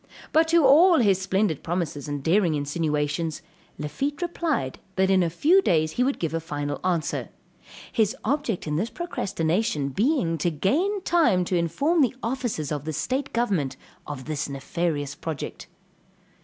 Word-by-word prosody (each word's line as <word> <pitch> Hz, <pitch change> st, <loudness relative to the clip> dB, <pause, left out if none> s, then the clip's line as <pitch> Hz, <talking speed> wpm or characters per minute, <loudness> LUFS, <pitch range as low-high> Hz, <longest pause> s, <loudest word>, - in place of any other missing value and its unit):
But 320 Hz, +1 st, +4 dB
to 330 Hz, -2 st, +4 dB
all 330 Hz, +6 st, +7 dB
his 195 Hz, -6 st, +3 dB
splendid 190 Hz, -4 st, 0 dB
promises 165 Hz, -4 st, -3 dB
and 145 Hz, -1 st, -4 dB
daring 170 Hz, -1 st, +3 dB
insinuations, 150 Hz, +1 st, -1 dB, 0.3 s
Lafitte 275 Hz, -, -3 dB
replied 325 Hz, -, -2 dB, 0.2 s
that 190 Hz, 0 st, +2 dB
in 190 Hz, -1 st, +4 dB
a 170 Hz, -, +1 dB
few 320 Hz, -, +4 dB
days 155 Hz, -, +2 dB
he 250 Hz, -, +1 dB
would 275 Hz, +2 st, 0 dB
give 165 Hz, -2 st, -2 dB
a 165 Hz, -, 0 dB
final 145 Hz, -2 st, -4 dB
answer; 175 Hz, -4 st, -1 dB, 0.6 s
his 220 Hz, +2 st, +1 dB
object 265 Hz, -5 st, -1 dB
in 150 Hz, -1 st, -1 dB
this 215 Hz, +7 st, -1 dB
procrastination 185 Hz, -, -1 dB
being 190 Hz, -, +1 dB
to 175 Hz, -, +1 dB
gain 320 Hz, -, 0 dB
time 305 Hz, -, +3 dB
to 180 Hz, -, -1 dB
inform 225 Hz, -, +1 dB
the 260 Hz, -2 st, +2 dB
officers 230 Hz, -, -2 dB
of 145 Hz, -2 st, -2 dB
the 155 Hz, -, -3 dB
state 260 Hz, -, -2 dB
government 180 Hz, -, 0 dB, 0.3 s
of 140 Hz, -3 st, -6 dB
this 150 Hz, -2 st, -3 dB
nefarious 145 Hz, +1 st, -2 dB
project. 160 Hz, -3 st, -6 dB
180 Hz, 155 wpm, -25 LUFS, -, 0.6 s, all